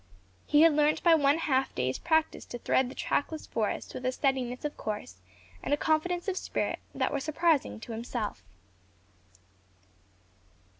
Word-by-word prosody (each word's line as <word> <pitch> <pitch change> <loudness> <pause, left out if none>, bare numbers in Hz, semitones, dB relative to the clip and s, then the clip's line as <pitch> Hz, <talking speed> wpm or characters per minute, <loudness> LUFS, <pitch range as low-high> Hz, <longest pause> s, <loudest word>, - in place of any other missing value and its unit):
He 295 - +5
had 330 -1 +7
learnt 300 0 +2
by 340 - +6
one 290 -1 +4
half 270 -5 0
day's 130 +1 -1
practice 320 -1 +1
to 240 - -7
thread 250 +1 +1
the - - -10
trackless 310 +2 -1
forest 215 -2 -2
with - - -6
a 255 - +1
steadiness 255 -1 -1
of 295 - -3
course 210 - -5 0.4
and 290 - +1
a - - -13
confidence 340 +4 0
of 385 -1 -1
spirit - - -2 0.2
that - - 0
were 285 - 0
surprising 310 -2 +1
to 235 - -8
himself. 225 - -4
285 Hz, 155 wpm, -29 LUFS, 245-315 Hz, 0.4 s, had